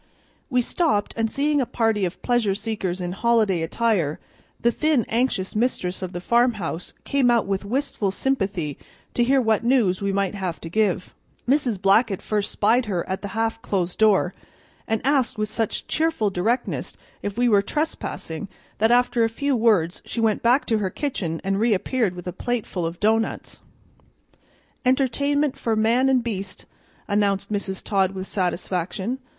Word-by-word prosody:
We 250 -2 +2
stopped, 235 - 0
and 225 -1 0
seeing 290 +3 +1
a - - 0
party 225 -4 +1
of 175 - -6
pleasure 240 -5 +2
seekers 200 -4 -3
in 175 0 -3
holiday 215 -3 +2
attire, 170 -3 0 0.4
the 235 - +3
thin, 305 -3 +1
anxious 225 -5 0
mistress 210 -6 -1
of 185 -1 -4
the 175 - -5
farmhouse 215 -5 0
came 275 -3 +2
out 235 -2 +3
with 195 0 -2
wistful 225 -2 -1
sympathy 195 - -1 0.3
to 240 - +2
hear 270 +3 +4
what 220 -3 +2
news 230 -7 +2
we 200 0 0
might 195 -1 0
have 185 -4 -4
to 165 - -6
give. 195 -1 0 0.3
Mrs. 255 -6 +2
Blackett 195 +1 +3
first 210 -1 -1
spied 230 +3 +2
her 180 -5 -2
at 190 0 -3
the 200 - -4
half 225 0 0
closed 180 -3 -2
door, 205 -4 +4 0.5
and 220 -1 0
asked 270 -5 +2
with 215 0 -1
such 220 0 -2
cheerful 315 -10 0
directness 225 +7 -1 0.2
if 205 +1 -4
we 245 0 +3
were 205 -4 +5
trespassing 205 - -3 0.3
that, 220 +2 +4
after 245 -1 +3
a 225 - +2
few 280 +4 -1
words, 205 -7 +2
she - - -5
went 220 -2 +2
back 245 +4 +3
to 225 -3 +1
her 195 -2 -1
kitchen 180 - -3
and 195 0 0
reappeared 220 -1 +1
with 180 - -8
a 180 - -4
plateful 200 -5 -2
of 170 +1 -7
doughnuts. 225 +1 0 1.2
"Entertainment 280 +2 +1
for 225 -1 -1
man 235 +5 +3
and 255 -2 +3
beast," 200 -5 -5 0.4
announced 200 -1 +1
Mrs. 190 -2 -3
Todd 195 -2 +1
with 190 0 -4
satisfaction. 190 +5 -2
215 Hz, 165 wpm, -23 LUFS, 190-245 Hz, 1.2 s, were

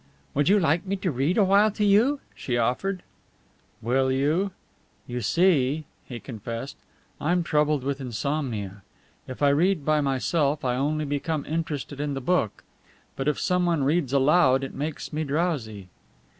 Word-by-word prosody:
"Would 145 +3 +2
you 205 +1 +5
like 165 -1 +2
me 195 0 -2
to 185 -2 -2
read 140 +7 0
a 210 - +5
while 200 +3 +5
to 210 0 -1
you?" 235 +8 +3
she 120 -2 -3
offered. 170 +11 -1 0.8
"Will 130 +3 +2
you? 150 +9 +1 0.6
You 125 0 -4
see," 155 - +2 0.2
he 120 -2 -7
confessed, 115 +4 -6 0.4
"I'm 175 +3 +1
troubled 150 -3 +1
with 140 +1 -2
insomnia. 120 -5 -3 0.5
If 130 +3 -6
I 140 - +6
read 160 +2 +2
by 155 -1 +3
myself 140 +2 0
I 125 -1 +1
only 150 +4 0
become 145 +1 -2
interested 150 -3 -4
in 145 -1 -2
the - - -2
book, 135 - 0 0.5
but 135 - -3
if 150 - +1
someone 175 -4 +1
reads 145 -1 +1
aloud 135 -1 +4
it 135 - -5
makes 150 +2 -5
me 155 +1 -1
drowsy." 140 - -2
145 Hz, 155 wpm, -25 LUFS, 130-170 Hz, 0.8 s, I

